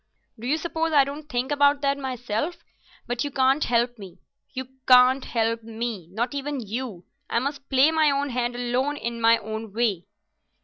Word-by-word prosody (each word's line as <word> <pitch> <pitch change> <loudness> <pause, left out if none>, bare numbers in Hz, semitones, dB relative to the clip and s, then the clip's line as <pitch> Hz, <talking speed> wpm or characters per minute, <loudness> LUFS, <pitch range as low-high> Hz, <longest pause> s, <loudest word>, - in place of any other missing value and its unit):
Do 235 - -6
you 300 +4 +2
suppose 325 0 -2
I 285 -2 +7
don't 290 +2 -7
think 250 +2 -2
about 285 0 +3
that 280 -1 +2
myself? 260 +3 -3 0.4
But 245 0 -2
you 290 - -2
can't 270 +2 +2
help 240 0 +1
me—you 200 +7 -10 0.2
can't 255 +1 +6
help 230 0 -1
me—not 225 - -4
even 285 0 -3
you. 220 -4 -5 0.2
I - - 0
must 275 +3 -3
play 270 +3 +5
my 315 -2 +3
own 280 0 0
hand 240 0 -1
alone 250 +4 -1
in 235 -2 -4
my 230 0 +6
own 220 -1 -6
way." 215 -6 0
250 Hz, 170 wpm, -25 LUFS, 230-280 Hz, 0.4 s, I